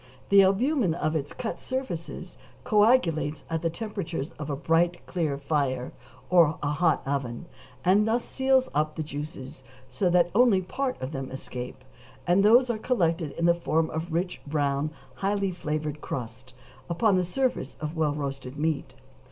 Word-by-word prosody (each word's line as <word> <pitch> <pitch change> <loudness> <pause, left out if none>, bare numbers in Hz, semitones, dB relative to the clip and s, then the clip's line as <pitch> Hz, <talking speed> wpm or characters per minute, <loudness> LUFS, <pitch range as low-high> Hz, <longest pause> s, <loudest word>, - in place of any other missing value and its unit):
The 200 0 +8
albumen 195 - +2
of 155 -2 -1
its 145 -2 -2
cut 240 -3 -5
surfaces 260 -11 -5 0.3
coagulates 175 - +3
at 165 -1 -1
the 165 - +1
temperature 180 -4 -4 0.2
of 150 -1 -5
a 140 - -1
bright, 170 +3 +1
clear 160 -6 -1
fire, 140 -3 -1 0.4
or 165 -4 +5
a 145 - +1
hot 160 +1 +2
oven, 135 -2 -3 0.4
and 200 +4 +4
thus 235 +2 +1
seals 265 -1 +2
up 155 +1 0
the 160 - -2
juices 145 -3 -7 0.3
so 185 - +1
that 175 0 +3
only 235 -2 +5
a 185 - -1
part 260 +7 -3
of 130 +2 -4
them 135 -3 -4
escape, 130 -1 -7 0.4
and 180 +3 +4
those 240 +5 +6
are 220 - -4
collected 170 - 0
in 170 - -1
the 170 - +6
form 165 -1 0
of 160 +2 -3
a - - -11
rich 175 +3 -2
brown, 145 0 0 0.3
highly 200 0 0
flavored 150 -3 -3
crust, 125 +1 -6 0.3
upon 195 +4 +3
the 185 - +2
surface 255 +9 -1
of 155 +2 -4
well 155 -2 +1
roasted 135 -2 -5
meat. 155 -1 -1
165 Hz, 170 wpm, -27 LUFS, 145-195 Hz, 0.4 s, The